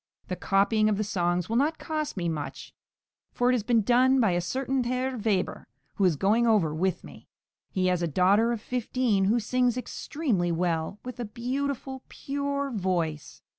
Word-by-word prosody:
The 185 Hz, -, -1 dB
copying 210 Hz, +3 st, +2 dB
of 210 Hz, -, +1 dB
the 215 Hz, -, 0 dB
songs 175 Hz, -3 st, 0 dB
will 230 Hz, -, 0 dB
not 305 Hz, +4 st, +1 dB
cost 310 Hz, -6 st, -3 dB
me 175 Hz, -2 st, -1 dB
much, 155 Hz, -3 st, -5 dB, 0.6 s
for 245 Hz, +1 st, +2 dB
it -, -, +2 dB
has 245 Hz, -, +1 dB
been 230 Hz, 0 st, +2 dB
done 255 Hz, +4 st, +4 dB
by 220 Hz, -6 st, +3 dB
a 175 Hz, 0 st, +1 dB
certain 260 Hz, +7 st, -1 dB
Herr 255 Hz, +1 st, -1 dB
Weber, 205 Hz, -5 st, -1 dB, 0.3 s
who 200 Hz, -, +3 dB
is 175 Hz, -4 st, +3 dB
going 215 Hz, +9 st, +2 dB
over 195 Hz, -9 st, +3 dB
with 180 Hz, +2 st, -1 dB
me. -, -, -13 dB, 0.4 s
He 185 Hz, -1 st, -1 dB
has 180 Hz, -1 st, +1 dB
a 170 Hz, -, +1 dB
daughter 195 Hz, +8 st, +3 dB
of 235 Hz, -3 st, -3 dB
fifteen, 240 Hz, -4 st, 0 dB
who 225 Hz, +5 st, +3 dB
sings 245 Hz, +2 st, +1 dB
extremely 245 Hz, -, -2 dB
well, 165 Hz, +1 st, -1 dB
with 250 Hz, -1 st, -7 dB
a 240 Hz, -, -2 dB
beautiful, 265 Hz, +3 st, -3 dB
pure 280 Hz, 0 st, -3 dB
voice. 175 Hz, -, -2 dB
220 Hz, 180 wpm, -27 LUFS, 180-255 Hz, 0.6 s, done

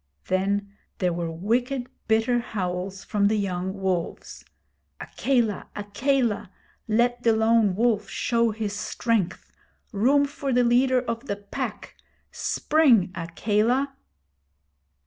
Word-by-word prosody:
Then 200 Hz, +2 st, 0 dB, 0.2 s
there 180 Hz, -2 st, 0 dB
were 170 Hz, -1 st, -3 dB
wicked, 240 Hz, +10 st, -1 dB, 0.2 s
bitter 225 Hz, +2 st, +2 dB
howls 190 Hz, -4 st, -4 dB
from 200 Hz, -2 st, +1 dB
the 215 Hz, -, +2 dB
young 190 Hz, -1 st, -2 dB
wolves: 185 Hz, -3 st, -3 dB, 0.6 s
'Akela! 240 Hz, -7 st, 0 dB
Akela! 225 Hz, 0 st, 0 dB, 0.4 s
Let 240 Hz, +2 st, +2 dB
the 230 Hz, -2 st, +3 dB
Lone 220 Hz, -3 st, +3 dB
Wolf 215 Hz, -2 st, +1 dB
show 235 Hz, -1 st, +1 dB
his 215 Hz, -1 st, -3 dB
strength. 210 Hz, -3 st, -1 dB, 0.4 s
Room 265 Hz, +7 st, +3 dB
for 280 Hz, -1 st, -4 dB
the 245 Hz, 0 st, +4 dB
leader 250 Hz, +2 st, +3 dB
of 230 Hz, +2 st, -4 dB
the 200 Hz, -, -1 dB
Pack! 200 Hz, 0 st, -6 dB, 0.4 s
Spring, 250 Hz, -, +3 dB
Akela!' 215 Hz, +10 st, 0 dB
220 Hz, 110 wpm, -25 LUFS, 195-245 Hz, 0.6 s, the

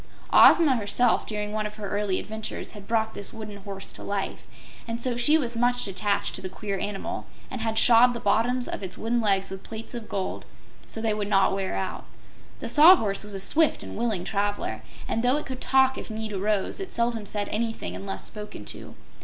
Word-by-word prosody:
Ozma 300 Hz, -7 st, +7 dB
herself, 225 Hz, +3 st, +1 dB
during 210 Hz, -1 st, -3 dB
one 215 Hz, 0 st, -1 dB
of 210 Hz, -, -11 dB
her 210 Hz, -1 st, -6 dB
early 205 Hz, -2 st, 0 dB
adventures, 220 Hz, 0 st, -6 dB
had 205 Hz, -2 st, -11 dB
brought 220 Hz, -1 st, 0 dB
this 200 Hz, -, -4 dB
wooden 215 Hz, -2 st, -8 dB
horse 195 Hz, -1 st, -7 dB
to -, -, -10 dB
life, 200 Hz, -1 st, -4 dB, 0.4 s
and 230 Hz, 0 st, -3 dB
so 245 Hz, 0 st, -1 dB
she 270 Hz, +6 st, +4 dB
was 240 Hz, -6 st, -2 dB
much 245 Hz, 0 st, +1 dB
attached 200 Hz, +1 st, 0 dB
to -, -, -4 dB
the 185 Hz, -, -4 dB
queer 200 Hz, 0 st, -4 dB
animal 200 Hz, -1 st, -4 dB, 0.2 s
and 255 Hz, -, -4 dB
had 220 Hz, 0 st, -1 dB
shod 240 Hz, +1 st, +6 dB
the -, -, -3 dB
bottoms 235 Hz, +4 st, +1 dB
of -, -, -5 dB
its 185 Hz, -2 st, -5 dB
wooden 235 Hz, +2 st, 0 dB
legs 195 Hz, -3 st, +1 dB
with 190 Hz, 0 st, -6 dB
plates 225 Hz, +3 st, -8 dB
of 235 Hz, -2 st, -7 dB
gold 190 Hz, -2 st, -3 dB, 0.4 s
so 225 Hz, -, -6 dB
they 220 Hz, -1 st, +1 dB
would 210 Hz, -1 st, -2 dB
not 195 Hz, -1 st, +4 dB
wear 195 Hz, -1 st, -2 dB
out. 190 Hz, -, -4 dB, 0.6 s
The -, -, -4 dB
Sawhorse 295 Hz, -, +6 dB
was 205 Hz, -1 st, -8 dB
a -, -, -4 dB
swift 310 Hz, +11 st, +2 dB
and -, -, -7 dB
willing 220 Hz, -6 st, -1 dB
traveler, 205 Hz, +1 st, -2 dB, 0.3 s
and 225 Hz, -, -1 dB
though 250 Hz, +4 st, +3 dB
it 300 Hz, -, -4 dB
could 260 Hz, -1 st, -6 dB
talk 265 Hz, 0 st, +3 dB
if -, -, -8 dB
need 220 Hz, -1 st, -4 dB
arose, 200 Hz, -, 0 dB
it 385 Hz, -, -5 dB
seldom 235 Hz, -3 st, -1 dB
said 205 Hz, 0 st, -2 dB
anything 225 Hz, +1 st, -2 dB
unless 195 Hz, 0 st, -5 dB
spoken 210 Hz, -, -7 dB
to. -, -, -9 dB
215 Hz, 210 wpm, -26 LUFS, 200-235 Hz, 0.6 s, Ozma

